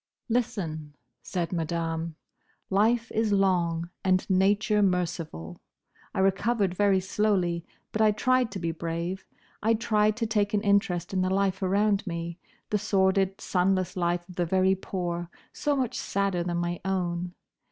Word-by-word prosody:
"Listen," 165 -11 -2 0.3
said 175 -1 -3
Madame, 165 -1 -2 0.6
"life 225 +4 +2
is 220 -1 +1
long, 175 -4 +1
and 185 -1 +2
nature 205 +3 +3
merciful. 170 - -1 0.5
I - - +2
recovered 195 0 +2
very 195 0 +3
slowly; 185 -3 0 0.2
but 220 - -1
I 215 - +6
tried 255 +3 +2
to 195 - -4
be 165 -1 -1
brave; 170 +3 -4 0.3
I 225 +2 +3
tried 215 -1 +2
to 230 - 0
take 210 -2 +1
an 205 - +2
interest 195 -4 +1
in 185 - +1
the 185 - +1
life 190 0 +1
around 200 +2 +2
me: 170 0 -4 0.3
the 210 - +2
sordid, 195 0 +2
sunless 185 0 +1
life 175 -1 0
of 180 - -13
the 175 - +1
very 190 +2 +3
poor, 175 -2 -3 0.2
so 290 -1 0
much 255 -4 -1
sadder 195 -2 0
than 175 0 -2
my 175 0 -2
own. 180 -2 -2
190 Hz, 150 wpm, -27 LUFS, 175-205 Hz, 0.6 s, I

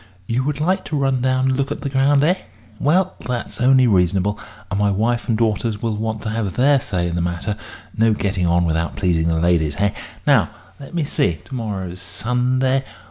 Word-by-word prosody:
You 120 +5 0
would 145 -1 -2
like 185 +5 +1
to 155 - -2
run 135 -2 +1
down 130 0 +1
and 130 0 +2
look 140 0 -1
at - - -4
the 140 - -3
ground, 135 +1 +3
eh? 170 +4 +4 0.5
Well, 180 +6 +2
that's 125 0 -4
only 130 0 +5
reasonable; 95 -1 +2 0.3
and 100 - 0
my 105 0 +3
wife 115 +5 0
and 115 - +2
daughters 110 -1 0
will 115 -1 -1
want 110 0 -3
to 110 - -2
have 105 -4 -2
their 140 +2 +4
say 90 -6 -2
in 85 - -3
the 85 - 0
matter 85 +4 -2 0.4
no 110 +1 +3
getting 95 -3 -1
on 85 0 +3
without 80 0 -1
pleasing 85 -4 +1
the 80 -1 +1
ladies, 80 -3 +2
hey? 100 0 +1 0.3
Now, - - +4 0.3
let 140 +4 -10
me 170 - +1
see. 85 - +1
To - - -12
morrow's 95 -7 -4
Sunday. 130 +6 0
110 Hz, 205 wpm, -20 LUFS, 95-130 Hz, 0.5 s, only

